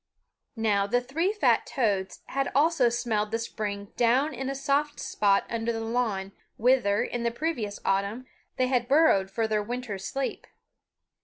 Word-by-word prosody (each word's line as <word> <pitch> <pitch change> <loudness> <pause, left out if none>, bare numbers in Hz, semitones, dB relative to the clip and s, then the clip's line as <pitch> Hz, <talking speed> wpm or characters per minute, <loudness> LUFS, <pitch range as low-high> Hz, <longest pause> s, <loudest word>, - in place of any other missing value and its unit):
Now 210 -3 +1
the 245 +4 +2
three 305 +10 -1
fat 420 - +2
toads 200 -8 -1
had 275 0 -1
also 290 -4 +4
smelled 220 -3 -1
the 225 - -1
spring 205 -3 -5
down 255 +6 +3
in 265 +1 -4
a 275 - -3
soft 285 +2 0
spot 200 -1 +2
under 230 0 -2
the 225 - -3
lawn, 225 -4 -1 0.3
whither, 225 -4 +3
in 240 - -3
the 235 - +1
previous 235 -5 -3
autumn, 200 +6 0 0.3
they 255 - +3
had 250 -2 0
burrowed 275 -10 +4
for 220 +3 -1
their 215 -1 +1
winter 235 -2 -4
sleep. 270 +7 -4
235 Hz, 160 wpm, -27 LUFS, 205-265 Hz, 0.3 s, also